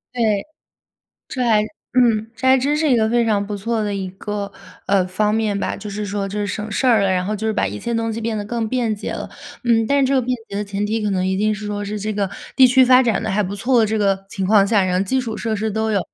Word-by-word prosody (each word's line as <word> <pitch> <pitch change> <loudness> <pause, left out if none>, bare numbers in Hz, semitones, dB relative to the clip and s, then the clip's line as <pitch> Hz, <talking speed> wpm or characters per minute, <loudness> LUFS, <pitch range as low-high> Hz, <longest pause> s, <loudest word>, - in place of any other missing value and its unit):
对。 215 -3 +1 0.8
这 255 - -3
还 215 -3 +4 0.3
嗯， 225 -3 +3
这 260 - -3
还 265 - +6
真 285 +4 +1
是 305 -1 +1
一 - - +5
个 220 -1 +2
非 235 +1 +2
常 205 -2 +1
不 205 0 -4
错 225 +2 -2
的 205 -1 -2
一 190 -1 -3
个， 200 +1 -5 0.3
呃， 195 -2 +2
方 210 +3 0
面 215 -2 0
吧。 - - -2
就 210 - -8
是 210 +1 -4
说 200 0 -3
就 205 +2 -5
是 205 - -1
省 210 +2 -4
事 260 - 0
儿 230 -4 +5
了， 195 - +2
然 185 -1 +1
后 210 - -2
就 220 - -3
是 220 - +1
把 195 - 0
一 105 +2 -6
切 235 - -3
东 225 0 -1
西 230 - -4
变 225 -1 -2
得 205 - -3
更 225 +1 -2
便 235 -2 0
捷 205 - -5
了。 - - -6 0.3
嗯， 225 -2 +3
但 280 +2 +2
是 - - +3
这 275 - +1
个 265 - +4
便 250 +1 -1
捷 200 - -6
的 205 - -2
前 200 0 -3
提， 220 +2 -1
可 210 - 0
能 185 -1 0
一 190 0 0
定 215 +1 +1
是 210 0 -7
说 205 0 -3
是 210 +1 -4
这 215 +1 -2
个 200 -1 -1 0.3
地 260 - +8
区 260 +1 +5
发 255 0 +6
展 230 -4 0
得 - - -2
还 210 +2 +1
不 195 +1 -4
错 245 +4 +2
的 220 - +3
这 220 - -1
个 195 -2 0
情 195 -1 -4
况 200 0 +5
下， 200 -2 +3
然 180 0 0
后 - - +2
基 260 +7 0
础 230 -3 -4
设 225 -2 -2
施 215 +2 -2
都 220 +1 -1
有。 200 - +2
215 Hz, 320 characters per minute, -20 LUFS, 200-230 Hz, 0.8 s, 地